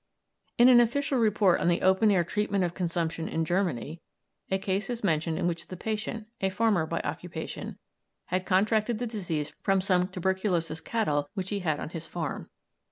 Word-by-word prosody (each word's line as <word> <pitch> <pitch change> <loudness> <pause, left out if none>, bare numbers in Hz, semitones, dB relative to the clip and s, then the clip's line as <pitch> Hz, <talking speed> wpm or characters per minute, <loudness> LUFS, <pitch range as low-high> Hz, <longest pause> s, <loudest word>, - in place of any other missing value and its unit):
In 240 - +7
an 250 -2 +8
official 265 +3 +2
report 210 -4 +3
on - - +1
the 175 0 +2
open 190 +4 +4
air 185 -4 +4
treatment 200 +2 0
of 175 -1 -1
consumption 165 -2 -2
in 165 0 -1
Germany 165 - -1 0.5
a 190 - +2
case 195 +2 -2
is 240 -2 -4
mentioned 160 -3 +1
in - - -1
which 170 -1 -2
the 185 - -7
patient, 220 +2 -3 0.2
a 195 - +2
farmer 195 -5 +1
by - - -2
occupation, - - -5 0.5
had 185 +1 -1
contracted 215 +4 +2
the 245 - -2
disease 170 -10 -3
from 195 -1 +2
some 185 -1 +2
tuberculous 185 -3 -1
cattle 150 -8 0
which 190 -1 -4
he 205 - 0
had 155 -5 -1
on - - -5
his 165 -1 -6
farm. 165 -4 -4
185 Hz, 180 wpm, -28 LUFS, 170-210 Hz, 0.5 s, an